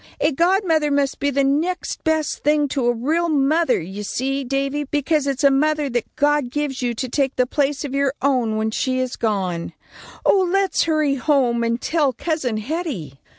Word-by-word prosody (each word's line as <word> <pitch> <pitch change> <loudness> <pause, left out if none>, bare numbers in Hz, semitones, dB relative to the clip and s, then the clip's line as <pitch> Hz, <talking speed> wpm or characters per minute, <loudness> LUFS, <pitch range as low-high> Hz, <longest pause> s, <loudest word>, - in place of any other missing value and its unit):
A 305 - +2
godmother 335 -1 +2
must 280 -1 0
be 285 - +1
the 280 0 +1
next 310 +7 -1
best 315 -2 0
thing 295 0 +2
to 260 -3 -1
a - - +4
real 310 +9 0
mother, 305 +1 +2
you 190 +5 -7
see, 270 +6 -2
Davy, 275 +2 -1
because 290 +1 0
it's 275 0 -2
a 280 - +6
mother 300 0 +1
that 240 -1 -3
God 295 -3 +2
gives 280 0 -3
you 240 -1 -1
to 255 +3 -3
take 270 +2 0
the 250 - +2
place 285 +2 -1
of 275 - -5
your 280 0 +1
own, 250 -5 +1
when 220 0 -1
she 255 +3 -1
is 255 -1 -2
gone. 185 -6 -2 0.5
Oh, 395 - +5
let's 390 0 +2
hurry 310 -3 +1
home 250 -3 +1
and 230 +1 0
tell 295 -4 +1
Cousin 270 -5 -2
Hetty." 215 - -4
275 Hz, 190 wpm, -21 LUFS, 250-305 Hz, 0.5 s, a